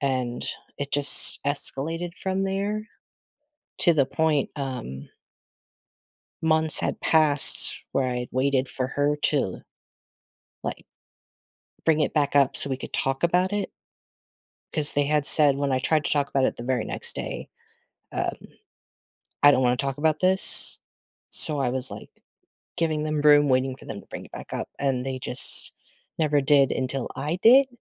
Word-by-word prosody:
and, 130 Hz, -3 st, -2 dB, 0.3 s
it 140 Hz, 0 st, -5 dB
just 145 Hz, 0 st, +4 dB
escalated 165 Hz, +5 st, -3 dB
from 190 Hz, 0 st, -3 dB
there 205 Hz, +3 st, -3 dB, 0.9 s
to 170 Hz, -, +4 dB
the 140 Hz, -3 st, +2 dB
point, 155 Hz, 0 st, -1 dB
um 125 Hz, -, -6 dB, 1.4 s
months 160 Hz, -1 st, +3 dB
had -, -, -3 dB
passed 155 Hz, -3 st, +4 dB, 0.2 s
where 130 Hz, -2 st, 0 dB
I'd 125 Hz, 0 st, -4 dB
waited 130 Hz, 0 st, 0 dB
for 130 Hz, -1 st, -4 dB
her 145 Hz, +2 st, -1 dB
to -, -, +2 dB
l -, -, -3 dB, 1.0 s
like, -, -, -6 dB, 1.0 s
bring 160 Hz, -1 st, +2 dB
it -, -, 0 dB
back 145 Hz, -2 st, 0 dB
up 140 Hz, -1 st, +3 dB
so 140 Hz, -, +5 dB
we 130 Hz, -, -2 dB
could -, -, -10 dB
talk 135 Hz, +2 st, -2 dB
about 180 Hz, +3 st, +1 dB
it 205 Hz, -1 st, -3 dB, 1.0 s
'cause 155 Hz, -2 st, +5 dB
they 145 Hz, 0 st, +1 dB
had 150 Hz, 0 st, 0 dB
said- 145 Hz, -3 st, +4 dB
when 140 Hz, -1 st, -2 dB
I 130 Hz, -, +1 dB
tried 155 Hz, +3 st, 0 dB
to -, -, -2 dB
talk 145 Hz, -1 st, 0 dB
about 135 Hz, -1 st, 0 dB
it -, -, -1 dB
the 120 Hz, -, -8 dB
very 125 Hz, -3 st, -1 dB
next -, -, -1 dB
day- -, -, -6 dB, 0.6 s
um, -, -, -2 dB, 1.1 s
“I 145 Hz, -, +8 dB
don't 130 Hz, -2 st, +2 dB
wanna 125 Hz, 0 st, +2 dB
talk 135 Hz, +1 st, -4 dB
about 155 Hz, 0 st, 0 dB
this,” 185 Hz, +1 st, +4 dB, 0.5 s
so 150 Hz, -3 st, +2 dB
I 135 Hz, -3 st, 0 dB
was, 130 Hz, 0 st, -2 dB
like, -, -, -10 dB, 0.7 s
giving 155 Hz, -2 st, -1 dB
them 155 Hz, -1 st, -2 dB
room, 145 Hz, -1 st, +5 dB
waiting 130 Hz, 0 st, 0 dB
for -, -, -17 dB
them -, -, -8 dB
to -, -, -24 dB
bring -, -, -9 dB
it -, -, -18 dB
back -, -, -10 dB
up, -, -, -5 dB
and 135 Hz, -2 st, -1 dB
they 130 Hz, -1 st, -4 dB
just 125 Hz, 0 st, +3 dB, 0.5 s
never 150 Hz, -3 st, +1 dB
did 140 Hz, -1 st, +3 dB
until 130 Hz, 0 st, -3 dB
I 150 Hz, +5 st, -3 dB
did. 265 Hz, +4 st, +6 dB
145 Hz, 165 wpm, -24 LUFS, 130-155 Hz, 1.4 s, I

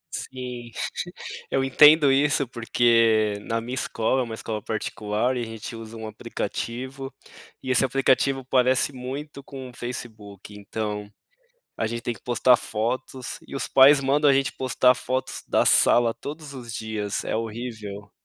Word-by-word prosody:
Sim, 125 Hz, -2 st, -6 dB, 0.8 s
eu 135 Hz, -, +1 dB
entendo 150 Hz, +2 st, +6 dB
isso, 140 Hz, 0 st, +3 dB
porque 115 Hz, -3 st, +2 dB
na 115 Hz, 0 st, -1 dB
minha 120 Hz, +2 st, -6 dB
escola 130 Hz, 0 st, 0 dB
é -, -, +1 dB
uma 115 Hz, -, -7 dB
escola 110 Hz, -1 st, -5 dB
particular, 110 Hz, +3 st, -2 dB
e -, -, -2 dB
a -, -, -4 dB
gente 115 Hz, +1 st, -7 dB
usa 115 Hz, 0 st, -9 dB
um 110 Hz, -, -7 dB
aplicativo, 130 Hz, +5 st, -5 dB, 0.5 s
e 130 Hz, -, -2 dB
esse 130 Hz, +1 st, +4 dB
aplicativo 135 Hz, 0 st, +2 dB
parece 130 Hz, +1 st, +2 dB
muito 140 Hz, +3 st, -7 dB
com 130 Hz, -2 st, -8 dB
o -, -, -15 dB
Facebook 110 Hz, -5 st, -8 dB
então, 105 Hz, 0 st, -5 dB, 0.7 s
a -, -, 0 dB
gente 115 Hz, +1 st, -3 dB
tem 120 Hz, 0 st, -2 dB
que -, -, -17 dB
postar 125 Hz, +1 st, +4 dB
fotos 125 Hz, +3 st, -3 dB
e -, -, -9 dB
os -, -, -2 dB
pais 140 Hz, +2 st, +7 dB
mandam 140 Hz, +2 st, +3 dB
a -, -, +6 dB
gente 135 Hz, +1 st, +1 dB
postar 125 Hz, 0 st, +3 dB
fotos 130 Hz, +1 st, -3 dB
da -, -, +2 dB
sala 120 Hz, -1 st, +5 dB
todos 150 Hz, 0 st, -8 dB
os 120 Hz, -4 st, -8 dB
dias, 110 Hz, -2 st, -3 dB
é -, -, -1 dB
horrível. 110 Hz, -3 st, -6 dB
120 Hz, 160 wpm, -24 LUFS, 110-130 Hz, 0.8 s, pais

